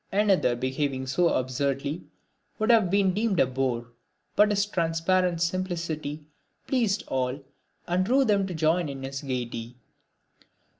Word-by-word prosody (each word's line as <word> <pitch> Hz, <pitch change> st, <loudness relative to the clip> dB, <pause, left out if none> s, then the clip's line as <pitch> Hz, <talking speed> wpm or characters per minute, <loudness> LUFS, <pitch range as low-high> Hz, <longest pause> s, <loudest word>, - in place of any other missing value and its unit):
Another 195 Hz, -11 st, +3 dB
behaving 130 Hz, +1 st, -2 dB
so 165 Hz, +7 st, +2 dB
absurdly 140 Hz, +4 st, -1 dB, 0.5 s
would 215 Hz, +2 st, +2 dB
have 220 Hz, -6 st, +4 dB
been 195 Hz, -1 st, +3 dB
deemed 210 Hz, -2 st, 0 dB
a -, -, +6 dB
bore, 125 Hz, -2 st, -2 dB, 0.4 s
but 210 Hz, 0 st, +5 dB
his 200 Hz, -1 st, +2 dB
transparent 170 Hz, -1 st, +1 dB
simplicity 170 Hz, -4 st, -3 dB, 0.4 s
pleased 225 Hz, -6 st, +1 dB
all 130 Hz, +1 st, -1 dB, 0.5 s
and 180 Hz, +2 st, +1 dB
drew 260 Hz, +7 st, +3 dB
them 200 Hz, -3 st, +2 dB
to 180 Hz, -, -5 dB
join 160 Hz, +1 st, +1 dB
in 135 Hz, -1 st, -7 dB
his 135 Hz, 0 st, -5 dB
gaiety. 120 Hz, -3 st, -4 dB
165 Hz, 135 wpm, -27 LUFS, 135-190 Hz, 0.5 s, a